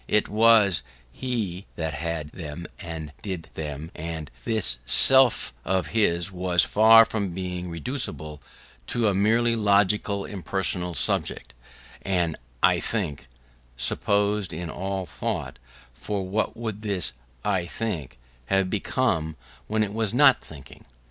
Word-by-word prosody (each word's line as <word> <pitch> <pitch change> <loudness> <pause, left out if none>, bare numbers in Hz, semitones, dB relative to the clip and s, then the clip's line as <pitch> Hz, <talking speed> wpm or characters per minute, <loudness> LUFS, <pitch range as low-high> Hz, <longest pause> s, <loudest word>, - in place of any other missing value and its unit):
It 105 - +2
was 110 -4 +5 0.3
he 100 - -4
that 80 -1 -3
had 75 -1 -4
them 80 0 -7
and 80 -3 -7
did 95 -5 -6
them; 75 +1 -6
and 80 -2 -6
this 95 - +1
self 130 - +5
of 95 -4 0
his 90 -4 +2
was 90 -1 +2
far 115 +2 +7
from 100 -6 -3
being 90 -1 -4
reducible 85 - -3 0.5
to 120 -2 +1
a 100 - +2
merely 115 +4 +2
logical 100 -1 +2
impersonal 90 -3 -1
subject, - - 0 0.5
an 90 -4 0 0.3
"I - - +5
think" 70 -3 -3 0.5
presupposed 100 +8 +1
in 80 +1 -5
all 95 0 -3
thought: - - -4 0.3
for 95 +9 -4
what 105 +4 -1
would 110 -3 -5
this 95 - -2 0.3
"I 95 -4 0
think" 90 - -4 0.3
have 95 -1 +1
become 95 -7 0 0.3
when 110 0 +1
it 100 -1 -4
was 110 0 0
not 140 -1 +6
thinking? 70 -5 -13
95 Hz, 130 wpm, -25 LUFS, 80-105 Hz, 0.5 s, far